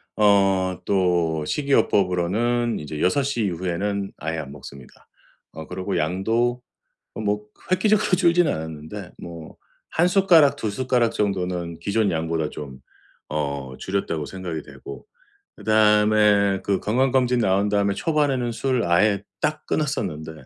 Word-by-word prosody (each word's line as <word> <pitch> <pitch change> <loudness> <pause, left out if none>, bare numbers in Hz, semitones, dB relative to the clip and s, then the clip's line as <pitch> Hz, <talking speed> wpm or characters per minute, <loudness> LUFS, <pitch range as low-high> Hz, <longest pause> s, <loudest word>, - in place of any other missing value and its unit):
어 100 -2 +4 0.3
또 85 -5 +1
식이요법으로는 115 - +1
이제 75 0 -6
6 140 +10 +2
시 130 -5 -1
이후에는 95 +2 -2
아예 80 +1 -3
안 70 -3 -7
먹습니다. 70 -2 -13 0.4
어 80 -1 -9
그리고 95 +1 -3
양도 115 +9 0 0.5
뭐 105 -1 -2
그 - - -23
획기적으로 205 +3 +2
줄지는 175 -3 +3
않았는데 80 +5 -7
뭐 85 -2 -10 0.3
'1 175 +2 +2
숟가락 170 -7 +5
2 110 -7 -3
숟가락 120 0 +1
정도는 90 -5 -2
기존 100 +3 +1
양보다 80 -1 -1
좀 70 -3 -8 0.5
어 70 -3 -3
줄였다.'고 95 -5 -2
생각이 90 -5 -6
되고 70 -1 -11 0.5
그다음에 105 -2 +3
그 100 -1 0
건강검진 125 +1 +2
나온 100 0 +2
다음에 100 -1 +1
초반에는 135 -2 0
술 125 0 0
아예 100 +4 +2 0.2
딱 150 0 -1
끊었었는데 95 - -2
100 Hz, 280 characters per minute, -23 LUFS, 85-120 Hz, 0.5 s, 숟가락